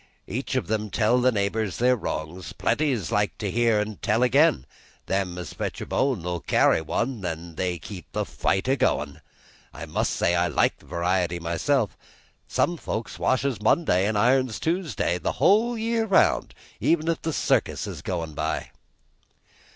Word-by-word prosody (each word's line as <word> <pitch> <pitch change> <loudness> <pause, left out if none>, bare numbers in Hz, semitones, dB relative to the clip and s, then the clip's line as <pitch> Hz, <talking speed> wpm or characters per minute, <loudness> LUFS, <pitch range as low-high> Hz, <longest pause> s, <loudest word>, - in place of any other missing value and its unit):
Each - - -4
of - - -1
'em 110 -1 -1
tell 120 +4 +2
the 130 +1 +4
neighbors 100 -1 -1
their 125 +1 +4
wrongs; 90 -5 -5
plenty 150 -3 +1
likes 105 0 -1
to 100 -3 -3
hear 115 -1 +3
and 105 -1 -4
tell 110 +4 +2
again; 125 - +4 0.4
them 95 -2 -1
as 90 -4 -6
fetch - - -4
a - - -5
bone'll 90 -10 -1
carry 80 - +3
one, 115 - -2
an' 85 -1 -4
so - - -17
they 90 +2 -2
keep 90 +1 -10
the - - -1
fight 95 +5 -1
a 135 - +3
goin'. 75 - 0 0.5
I - - -8
must - - -1
say 85 - +1
I 85 0 +2
like - - +1
variety 90 0 -1
myself; 95 - 0 0.5
some 175 - 0
folks 110 -7 -5
washes 130 -3 0
Monday 105 - +3
an' 110 0 0
irons 125 +1 +2
Tuesday 160 - -1
the - - -2
whole 230 +4 +3
year 225 0 0
round, 195 - +3 0.2
even 165 -1 +1
if 165 -1 0
the 160 - -2
circus - - 0
is - - -7
goin' 85 -4 -3
by!" - - -3
105 Hz, 165 wpm, -25 LUFS, 90-130 Hz, 0.5 s, the